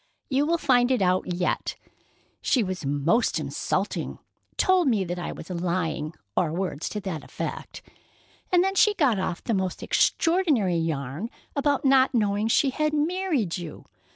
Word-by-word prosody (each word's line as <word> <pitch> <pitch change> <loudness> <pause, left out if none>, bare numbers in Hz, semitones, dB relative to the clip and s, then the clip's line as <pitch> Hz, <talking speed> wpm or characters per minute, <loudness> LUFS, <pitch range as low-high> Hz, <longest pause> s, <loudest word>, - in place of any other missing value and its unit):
You 280 +2 +2
will 340 +1 +2
find 250 -5 +3
it 250 -6 +2
out 185 0 +1
yet. 175 +1 -1 0.7
She 250 - +2
was 185 -6 -4
most 145 - +1
insulting—told 370 -4 -1
me 220 -6 +2
that 175 0 -4
I 175 - -4
was 165 - -9
lying, 170 -3 -2 0.2
or 170 -4 +1
words 175 -3 -3
to 210 - -4
that 185 -5 -5
effect—and 360 -1 -4
then 385 0 0
she 415 +2 +4
got 265 - +2
off 180 -2 -3
the 230 - -1
most 190 -3 -2
extraordinary 300 - +2
yarn 160 - -3 0.3
about 285 -1 +1
not 265 -1 +4
knowing 210 -1 +1
she 270 +4 +3
had 305 +2 0
married 305 - 0
you. 170 -3 -8
210 Hz, 150 wpm, -26 LUFS, 175-285 Hz, 0.7 s, she